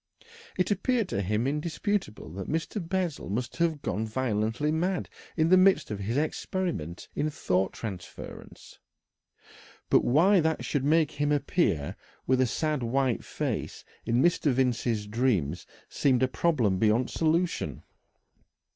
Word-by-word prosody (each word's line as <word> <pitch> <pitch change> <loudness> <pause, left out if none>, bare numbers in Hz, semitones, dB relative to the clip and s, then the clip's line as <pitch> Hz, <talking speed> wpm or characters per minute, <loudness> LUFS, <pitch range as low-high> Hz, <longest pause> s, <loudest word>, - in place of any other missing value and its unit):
It 185 +2 +1
appeared 225 +2 +1
to 100 - -1
him 105 +5 0
indisputable 150 - -2
that 95 0 -6
Mr. 165 +6 -2
Bessel 175 - -2
must 120 +5 -3
have 165 -4 0
gone 110 +1 -1
violently 115 +4 0
mad 180 +4 0 0.3
in 160 0 +3
the 185 - +7
midst 185 - +4
of 105 - -3
his 110 +6 -2
experiment 155 - -2
in 155 - 0
thought 95 - 0
transference, 95 -6 -9 1.1
but - - +5
why 180 +10 +5
that 160 -6 0
should 130 +3 -1
make 155 +1 +3
him 145 0 -1
appear 145 - +1 0.3
with 130 0 +3
a 130 - +3
sad 150 +4 -1
white 125 +1 0
face - - -4 0.2
in 120 +3 +2
Mr. 165 -4 +3
Vincey's 120 -4 0
dreams 105 - 0 0.2
seemed 130 -3 +2
a - - +4
problem 125 - +1
beyond 115 +4 +2
solution. 165 +2 0
135 Hz, 140 wpm, -28 LUFS, 110-165 Hz, 1.1 s, the